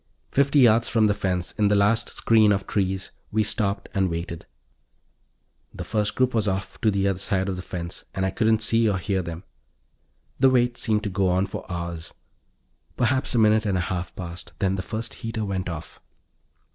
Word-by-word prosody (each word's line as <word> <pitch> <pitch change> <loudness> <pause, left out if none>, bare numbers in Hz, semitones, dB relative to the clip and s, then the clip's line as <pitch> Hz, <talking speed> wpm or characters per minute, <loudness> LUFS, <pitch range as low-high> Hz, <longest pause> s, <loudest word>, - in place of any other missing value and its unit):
Fifty 140 +1 +2
yards 115 -3 +5
from 110 -2 +3
the 105 - +3
fence, 90 -3 -2
in 105 - +4
the 105 - +3
last 105 +3 +2
screen 110 -2 +4
of 100 -1 0
trees, 95 -2 -1 0.2
we 110 0 +2
stopped 100 -2 -1
and 95 -1 +1
waited. 85 0 -5 1.3
The - - -5
first 105 -1 -1
group 130 0 +2
was 110 -2 +1
off 95 0 -3
to 110 - +3
the 100 -1 +1
other 95 -2 0
side 95 0 0
of 95 - -2
the 90 - -5
fence, 85 -1 -6
and 95 - 0
I 95 - 0
couldn't 110 +2 +2
see 115 0 +3
or 100 - 0
hear 95 0 -1
them. 85 0 -7 1.0
The 135 0 +6
wait 120 -1 +2
seemed 110 -3 0
to 105 - -3
go 95 0 +1
on 90 +2 +2
for 95 - -7
hours; 85 -2 -5 0.8
perhaps 130 +1 +1
a - - +3
minute 110 -1 +4
and 95 -2 +1
a 90 - -2
half 90 -1 -4
passed. 85 -1 -8
Then 95 -1 +1
the 95 - -2
first 110 +5 -5
heater 115 -1 -3
went 95 -2 -3
off. 80 -1 -8
100 Hz, 195 wpm, -24 LUFS, 95-110 Hz, 1.3 s, The